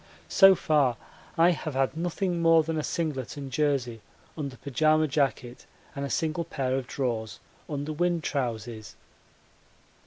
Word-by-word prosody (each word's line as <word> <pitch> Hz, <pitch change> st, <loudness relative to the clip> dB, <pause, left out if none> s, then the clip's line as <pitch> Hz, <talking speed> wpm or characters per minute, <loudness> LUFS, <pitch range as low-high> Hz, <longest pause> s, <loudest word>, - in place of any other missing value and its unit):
So 195 Hz, -1 st, +7 dB
far 145 Hz, -8 st, +2 dB, 0.4 s
I 170 Hz, +2 st, +6 dB
have 155 Hz, -4 st, -4 dB
had 135 Hz, +2 st, +1 dB
nothing 175 Hz, +1 st, -2 dB
more 165 Hz, -1 st, +5 dB
than 160 Hz, +1 st, -3 dB
a 155 Hz, -, 0 dB
singlet 150 Hz, -6 st, -3 dB
and 140 Hz, -2 st, -6 dB
jersey 130 Hz, -5 st, 0 dB, 0.3 s
under 140 Hz, -4 st, -5 dB
pyjama 155 Hz, +4 st, +2 dB
jacket 135 Hz, -4 st, -2 dB, 0.3 s
and 140 Hz, -, -4 dB
a 140 Hz, -, -3 dB
single 160 Hz, +3 st, -1 dB
pair 130 Hz, -2 st, -2 dB
of 130 Hz, -2 st, -3 dB
drawers 115 Hz, -5 st, -3 dB, 0.3 s
under 145 Hz, +1 st, -3 dB
wind 175 Hz, +1 st, 0 dB
trousers. 115 Hz, -5 st, -4 dB
145 Hz, 145 wpm, -27 LUFS, 130-160 Hz, 0.4 s, So